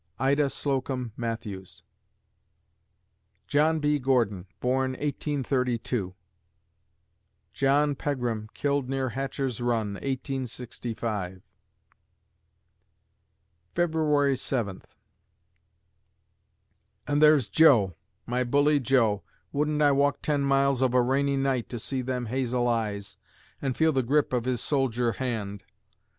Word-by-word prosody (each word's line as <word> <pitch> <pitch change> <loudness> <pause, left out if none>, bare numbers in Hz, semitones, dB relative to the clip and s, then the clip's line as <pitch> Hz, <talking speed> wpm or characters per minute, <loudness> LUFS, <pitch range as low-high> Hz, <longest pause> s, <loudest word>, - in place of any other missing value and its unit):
IDA 140 +2 +2
SLOCOMB 130 -3 -2
MATTHEWS 110 -5 -6 1.6
John 155 +2 +2
B. 150 0 +1
Gordon 115 -8 +1
born, 130 +1 0
1832 125 -8 -2 1.4
John 145 +2 +2
Pegram 120 -7 -3
killed 140 -2 0
near 135 -1 -1
Hatcher's 135 0 -3
Run, 115 -4 0
1865 115 -6 -4 2.3
February 155 -5 +2
Seventh 120 -7 -3 2.1
And 145 0 +1
there's 150 -6 +6
Joe 105 - +5 0.3
my 125 +1 0
bully 145 +4 +3
Joe 115 -6 +2 0.3
wouldn't 150 +1 +1
I 145 - +5
walk 140 +1 +1
ten 145 -2 +1
miles 140 -1 +2
of 130 -1 +2
a 125 - +6
rainy 140 +2 +1
night 135 -3 0
to 120 - -4
see 130 +3 -2
them 125 -1 -3
hazel 125 0 0
eyes, 105 -4 -2 0.4
and 135 -3 -2
feel 160 0 +4
the 135 - +2
grip 140 +3 +1
of 125 -2 0
his 130 -2 -1
soldier 125 -4 +1
hand? 110 -5 -4
130 Hz, 105 wpm, -27 LUFS, 115-140 Hz, 2.3 s, there's